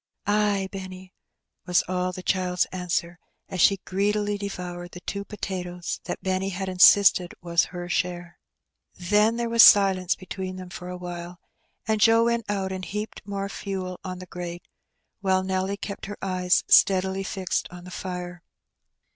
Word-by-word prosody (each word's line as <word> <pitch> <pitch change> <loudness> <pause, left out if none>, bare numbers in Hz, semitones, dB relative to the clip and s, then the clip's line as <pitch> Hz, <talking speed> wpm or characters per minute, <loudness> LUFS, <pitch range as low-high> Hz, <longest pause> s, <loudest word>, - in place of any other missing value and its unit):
"Ay, 205 -1 +1
Benny," 185 -1 -8 0.5
was 180 -1 +3
all 185 0 -1
the 180 0 -8
child's 180 -2 +1
answer, 180 -1 -2 0.3
as 185 - -2
she 195 - +5
greedily 205 +2 0
devonred 180 -3 -6
the 180 - -8
two 200 +1 -4
potatoes 180 -4 -5
that - - -5
Benny 190 +1 0
had 190 0 -4
inaisted 185 -1 +6 1.6
Then 210 +5 +2
there 235 0 -1
was 230 0 +5
silence 190 -4 +6
hetween 185 0 -6
them 185 -1 -9
for 180 +1 -7
awhile, 175 -1 -7 0.5
and 220 -1 +1
Joe 225 +1 +6
went 235 -2 0
ont 195 -2 -1
and 185 0 -5
heaped 210 +2 -5
more 200 -1 -3
fdel 190 -2 -5
on 185 -1 -5
the 185 - -9
grate, 175 0 -7 0.5
while 190 -2 +1
Nelly 190 +1 -1
kept 200 0 -6
her 205 - -7
eyes 185 -1 +1
steadily 190 -1 +4
fixed 190 -1 -2
on 175 0 -11
the 180 - -11
fire. 180 -1 -6
185 Hz, 145 wpm, -25 LUFS, 180-200 Hz, 1.6 s, inaisted